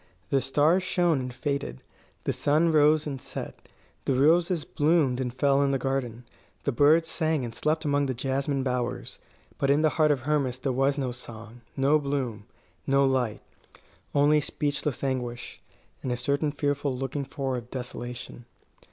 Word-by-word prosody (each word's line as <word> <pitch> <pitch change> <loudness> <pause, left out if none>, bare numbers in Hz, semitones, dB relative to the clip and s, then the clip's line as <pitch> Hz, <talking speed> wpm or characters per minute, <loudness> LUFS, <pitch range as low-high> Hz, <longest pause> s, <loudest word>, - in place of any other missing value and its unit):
The 135 - +3
stars 150 +7 +3
shone 175 -4 +1
and 125 0 -4
faded; 125 - -3 0.4
the - - 0
sun 155 +3 +2
rose 155 0 +4
and 135 -3 -5
set; - - -8 0.4
the 135 - +1
roses 165 +4 +3
bloomed 145 -4 +2
and 125 -2 -2
fell 140 +2 +2
in 140 - +2
the 135 - +1
garden; 125 -3 -3 0.4
the 140 - 0
birds 150 +6 +4
sang 160 -4 0
and 115 - -6
slept 155 +4 -1
among 145 -1 +2
the 130 - -2
jasmine 135 +2 -1
bowers. 125 -2 -3 0.4
But 140 - +1
in 145 +3 +4
the 155 - +5
heart 155 0 +2
of 145 -4 +2
Hermas 140 -2 0
there 130 +1 -2
was 135 +2 +1
no 130 -3 -1
song, 120 -1 -10 0.2
no 140 +3 +4
bloom, 130 -7 -3 0.4
no 140 0 +4
light 130 -5 0 0.7
only 150 +1 +4
speechless 145 -2 -2
anguish, 125 -3 -3 0.4
and 130 - -3
a 125 - -1
certain 140 +4 0
fearful 145 -1 -1
looking 135 +2 -3
for 135 -1 -3
of 120 -1 -6
desolation. 125 -1 -7
140 Hz, 165 wpm, -27 LUFS, 125-150 Hz, 0.7 s, the